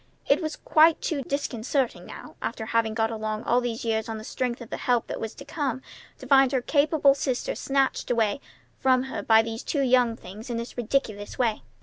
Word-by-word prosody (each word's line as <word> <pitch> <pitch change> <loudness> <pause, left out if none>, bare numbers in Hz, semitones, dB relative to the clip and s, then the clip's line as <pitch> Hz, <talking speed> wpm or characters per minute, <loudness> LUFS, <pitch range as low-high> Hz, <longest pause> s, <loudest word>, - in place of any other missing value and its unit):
It - - +3
was 310 -1 -3
quite 320 +1 +4
too 295 -4 -2
disconcerting 265 -1 -2
now, - - -10
after 220 - -4
having 225 -1 0
got 225 0 +1
along 215 -1 -3
all 245 +1 +2
these 240 -1 -3
years 220 -1 -1
on 220 - -3
the 215 - -8
strength 245 +1 -3
of 235 -2 -11
the - - -3
help 245 -2 +1
that - - -5
was 225 - -5
to 280 - -11
come, 280 -4 -3 0.3
to - - -11
find 270 -2 +5
her 260 - +3
capable 290 -1 +4
sister 265 -2 -2
snatched 275 -1 0
away 230 +1 +1 0.4
from 255 -1 +3
her 265 - -5
by 220 0 +5
two 225 +6 -3
young 250 -3 +3
things 215 +5 -10
in 235 - -2
this 235 +1 -6
ridiculous 220 -4 -2
way. 230 - +1
245 Hz, 205 wpm, -26 LUFS, 225-275 Hz, 0.4 s, find